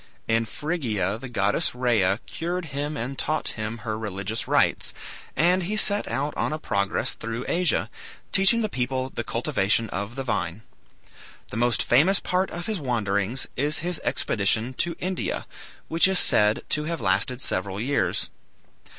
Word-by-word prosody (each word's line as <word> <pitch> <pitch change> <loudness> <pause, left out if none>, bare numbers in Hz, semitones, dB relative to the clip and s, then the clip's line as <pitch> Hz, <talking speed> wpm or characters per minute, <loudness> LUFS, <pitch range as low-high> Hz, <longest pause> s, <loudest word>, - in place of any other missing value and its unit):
In 115 0 +2
Phrygia 115 - -2
the 135 +1 -7
goddess 105 0 +1
Rhea 110 -6 +2
cured 175 +2 -3
him 145 +2 -2
and 130 +3 -4
taught 155 +1 0
him 110 +1 -4
her 110 -1 -2
religious 105 0 -3
rites, - - +2 0.4
and 180 +4 +3
he 205 +5 -2
set 205 -1 +4
out 140 +6 -2
on - - 0
a 155 - -1
progress 100 -9 -1
through 115 +2 -5
Asia, 175 -2 +1 0.4
teaching 195 +5 +5
the - - +2
people 130 -3 -2
the - - -3
cultivation 105 +4 0
of 100 +5 -4
the 135 - -3
vine. 105 -4 -2 0.9
The - - -5
most 120 0 +3
famous 165 +11 +4
part 185 +1 0
of 175 0 -5
his 215 -4 -2
wanderings 110 -3 0
is 145 +3 +1
his 180 -2 +1
expedition 110 +4 0
to 170 -1 +1
India, 185 0 -2 0.4
which 165 +3 +4
is 190 -1 +2
said 105 -9 +4
to 150 0 +1
have 165 0 -2
lasted 100 +7 +1
several 95 -4 -2
years. 135 +6 0
125 Hz, 160 wpm, -25 LUFS, 110-165 Hz, 0.9 s, teaching